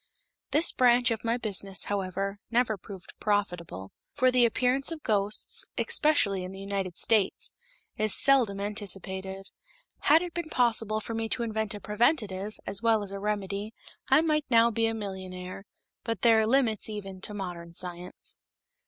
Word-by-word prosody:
This 320 Hz, +3 st, +4 dB
branch 245 Hz, -1 st, +4 dB
of 225 Hz, -, -2 dB
my 230 Hz, +1 st, 0 dB
business, 200 Hz, -4 st, -1 dB
however, 195 Hz, 0 st, -3 dB
never 235 Hz, -1 st, +2 dB
proved 195 Hz, -1 st, -11 dB
profitable, 175 Hz, -, -2 dB, 0.2 s
for 255 Hz, 0 st, +3 dB
the 250 Hz, -1 st, +5 dB
appearance 255 Hz, +5 st, +1 dB
of 315 Hz, -2 st, -6 dB
ghosts, 205 Hz, -2 st, +1 dB
especially 200 Hz, -11 st, +3 dB
in 185 Hz, -, -6 dB
the 195 Hz, -, -9 dB
United 195 Hz, -2 st, -4 dB
States, 215 Hz, -4 st, +1 dB, 0.5 s
is 215 Hz, 0 st, +2 dB
seldom 240 Hz, -5 st, +3 dB
anticipated. 195 Hz, -2 st, -3 dB, 0.5 s
Had 320 Hz, +4 st, +6 dB
it 350 Hz, -1 st, -6 dB
been 340 Hz, -2 st, -4 dB
possible 225 Hz, -5 st, +1 dB
for 230 Hz, -, -5 dB
me 225 Hz, 0 st, -2 dB
to 240 Hz, -, -1 dB
invent 220 Hz, -1 st, -1 dB
a -, -, -7 dB
preventive 210 Hz, -3 st, 0 dB
as 200 Hz, +1 st, -2 dB
well 225 Hz, -2 st, +3 dB
as 195 Hz, -, -6 dB
a 200 Hz, -, -5 dB
remedy, 205 Hz, +1 st, -3 dB, 0.3 s
I 270 Hz, +3 st, +6 dB
might 305 Hz, -2 st, +1 dB
now 235 Hz, -1 st, +5 dB
be 225 Hz, +1 st, +1 dB
a 225 Hz, -, -2 dB
millionaire; 190 Hz, -2 st, -7 dB, 0.4 s
but 225 Hz, -5 st, -3 dB
there 225 Hz, -2 st, +6 dB
are 220 Hz, -, +2 dB
limits 230 Hz, -4 st, +1 dB
even 195 Hz, -3 st, -7 dB
to 210 Hz, +1 st, -4 dB
modern 175 Hz, -4 st, -6 dB
science. 180 Hz, +1 st, -5 dB
210 Hz, 160 wpm, -28 LUFS, 195-235 Hz, 0.5 s, Had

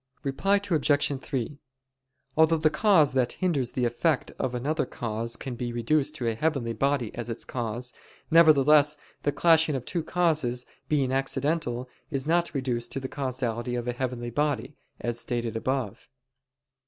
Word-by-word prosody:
Reply 155 Hz, +8 st, +1 dB, 0.2 s
Obj. 145 Hz, -3 st, +2 dB
3: 135 Hz, +1 st, -4 dB, 0.8 s
Although 160 Hz, +1 st, +5 dB
the 155 Hz, 0 st, +2 dB
cause 170 Hz, -11 st, +4 dB
that 130 Hz, -2 st, +1 dB
hinders 150 Hz, -10 st, 0 dB
the 125 Hz, -, 0 dB
effect 130 Hz, +4 st, 0 dB
of 125 Hz, -1 st, -1 dB
another 140 Hz, +3 st, -1 dB
cause 115 Hz, 0 st, -4 dB
can 130 Hz, +2 st, -6 dB
be 120 Hz, 0 st, -4 dB
reduced 145 Hz, +5 st, +1 dB
to 125 Hz, -6 st, -2 dB
a 115 Hz, -, +1 dB
heavenly 130 Hz, -2 st, -1 dB
body 135 Hz, -1 st, 0 dB
as 120 Hz, -1 st, -5 dB
its 115 Hz, -, -4 dB
cause; 120 Hz, 0 st, -4 dB, 0.4 s
nevertheless 150 Hz, -2 st, +6 dB, 0.2 s
the 145 Hz, -, +1 dB
clashing 160 Hz, 0 st, +4 dB
of 130 Hz, -2 st, -4 dB
two 175 Hz, -, -1 dB
causes, 155 Hz, -8 st, 0 dB, 0.2 s
being 140 Hz, -4 st, +1 dB
accidental, 135 Hz, -1 st, 0 dB, 0.2 s
is 135 Hz, -4 st, -2 dB
not 170 Hz, +2 st, +2 dB
reduced 125 Hz, -3 st, -2 dB
to 135 Hz, -, -1 dB
the 130 Hz, -, -4 dB
causality 125 Hz, -3 st, -3 dB
of 120 Hz, 0 st, -3 dB
a 120 Hz, -, 0 dB
heavenly 120 Hz, -1 st, -3 dB
body, 140 Hz, -1 st, -1 dB, 0.2 s
as 120 Hz, 0 st, -2 dB
stated 120 Hz, -2 st, -2 dB
above. 125 Hz, -2 st, -2 dB
135 Hz, 155 wpm, -27 LUFS, 120-150 Hz, 0.8 s, nevertheless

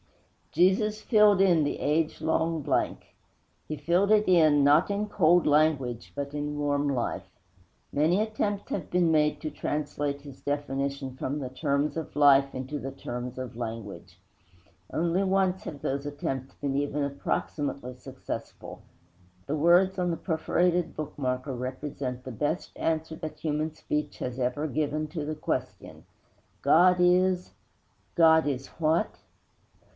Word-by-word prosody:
Jesus 195 Hz, +5 st, +2 dB
filled 210 Hz, -3 st, +4 dB
in 175 Hz, -5 st, +4 dB
the 145 Hz, -, -2 dB
age 155 Hz, +2 st, 0 dB
long 160 Hz, 0 st, 0 dB
blank; -, -, -1 dB, 0.5 s
He 155 Hz, -, -4 dB
filled 175 Hz, +7 st, +2 dB
it 215 Hz, 0 st, +4 dB
in, 155 Hz, -5 st, +5 dB
not 145 Hz, +6 st, +5 dB
in 205 Hz, +1 st, -1 dB
cold 175 Hz, -3 st, +3 dB
language, 145 Hz, -6 st, +1 dB
but 140 Hz, 0 st, -5 dB
in 150 Hz, 0 st, -3 dB
warm 145 Hz, 0 st, 0 dB
life. 125 Hz, -4 st, -2 dB, 0.6 s
Many 160 Hz, +6 st, +3 dB
attempts 210 Hz, -2 st, -2 dB
have 175 Hz, -, -3 dB
been 175 Hz, -2 st, +2 dB
made 150 Hz, -1 st, +2 dB
to 155 Hz, -, -4 dB
translate 145 Hz, -1 st, -3 dB
His 140 Hz, -2 st, -12 dB
definition 140 Hz, -2 st, -3 dB
from 135 Hz, +2 st, -3 dB
the 130 Hz, -3 st, -4 dB
terms 140 Hz, +2 st, 0 dB
of 160 Hz, -1 st, -5 dB
life 140 Hz, -2 st, +5 dB
into 130 Hz, +3 st, -4 dB
the 135 Hz, 0 st, -5 dB
terms 125 Hz, -1 st, -6 dB
of 130 Hz, -3 st, -6 dB
language. 105 Hz, -7 st, -7 dB, 0.7 s
Only 170 Hz, +4 st, +1 dB
once 190 Hz, -1 st, +1 dB
have 145 Hz, -3 st, -7 dB
those 140 Hz, +1 st, -2 dB
attempts 135 Hz, -2 st, -4 dB
been 140 Hz, -1 st, -3 dB
even 145 Hz, +1 st, -1 dB
approximately 140 Hz, -1 st, -3 dB
successful. 125 Hz, -, -8 dB, 0.6 s
The 145 Hz, -, -2 dB
words 175 Hz, +5 st, +4 dB
on 180 Hz, -1 st, +1 dB
the 165 Hz, -, -2 dB
perforated 175 Hz, +1 st, 0 dB
bookmarker 130 Hz, -3 st, -3 dB
represent 130 Hz, 0 st, -5 dB
the 130 Hz, -, -7 dB
best 150 Hz, -, -2 dB
answer 160 Hz, 0 st, -1 dB
that 155 Hz, -2 st, -7 dB
human 155 Hz, 0 st, -2 dB
speech 150 Hz, -1 st, -3 dB
has 125 Hz, +1 st, -5 dB
ever 130 Hz, +5 st, -1 dB
given 155 Hz, +1 st, -1 dB
to 155 Hz, -1 st, -4 dB
the 155 Hz, +1 st, -3 dB
question. 155 Hz, -, -4 dB, 0.6 s
_God 180 Hz, +2 st, +5 dB
is 180 Hz, 0 st, +3 dB, 0.7 s
_ -, -, +2 dB
_God 160 Hz, -1 st, +6 dB
is 135 Hz, -2 st, -2 dB
what? 160 Hz, +1 st, +1 dB
150 Hz, 145 wpm, -28 LUFS, 140-170 Hz, 0.7 s, God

